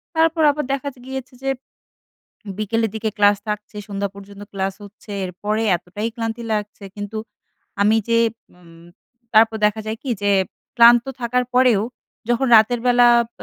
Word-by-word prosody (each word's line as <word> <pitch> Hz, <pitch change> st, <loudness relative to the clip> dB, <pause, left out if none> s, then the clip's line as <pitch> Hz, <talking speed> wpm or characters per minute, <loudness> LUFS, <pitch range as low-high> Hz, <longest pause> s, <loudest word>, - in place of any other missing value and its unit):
তারপর 325 Hz, 0 st, +2 dB
আবার 300 Hz, +1 st, -3 dB
দেখা 275 Hz, +1 st, -3 dB
যে 250 Hz, -, -19 dB
গিয়েছে 265 Hz, -1 st, -6 dB
যে 270 Hz, -, -1 dB, 1.1 s
বিকেলের 225 Hz, +2 st, 0 dB
দিকে 220 Hz, 0 st, -2 dB
class 205 Hz, 0 st, +4 dB
থাকছে। 210 Hz, 0 st, -5 dB
সন্ধ্যা 200 Hz, -1 st, -3 dB
পর্যন্ত 200 Hz, 0 st, -12 dB
class 195 Hz, 0 st, -2 dB
হচ্ছে। 205 Hz, +1 st, -13 dB
এরপরে 205 Hz, +4 st, -3 dB, 0.2 s
এতটাই 195 Hz, +6 st, -5 dB
ক্লান্তি 225 Hz, 0 st, -4 dB
লাগছে 210 Hz, -1 st, -4 dB
কিন্তু 205 Hz, +2 st, -5 dB, 0.6 s
আমি 215 Hz, +2 st, +4 dB
যে 230 Hz, -, +4 dB, 0.4 s
উম 165 Hz, -1 st, -17 dB, 0.5 s
তারপর 220 Hz, 0 st, +5 dB
দেখা 215 Hz, +1 st, 0 dB
যায় 220 Hz, +1 st, -4 dB
কি 265 Hz, -, -5 dB
যে 205 Hz, 0 st, +2 dB, 0.4 s
ক্লান্ত 235 Hz, 0 st, +7 dB, 0.2 s
থাকার 250 Hz, +1 st, +1 dB
পরেও 250 Hz, -5 st, +4 dB, 0.5 s
যখন 240 Hz, +3 st, +2 dB
রাতের 220 Hz, +2 st, +4 dB
বেলা 245 Hz, 0 st, +6 dB, 0.2 s
এব -, -, -24 dB
220 Hz, 150 wpm, -21 LUFS, 205-240 Hz, 1.1 s, ক্লান্ত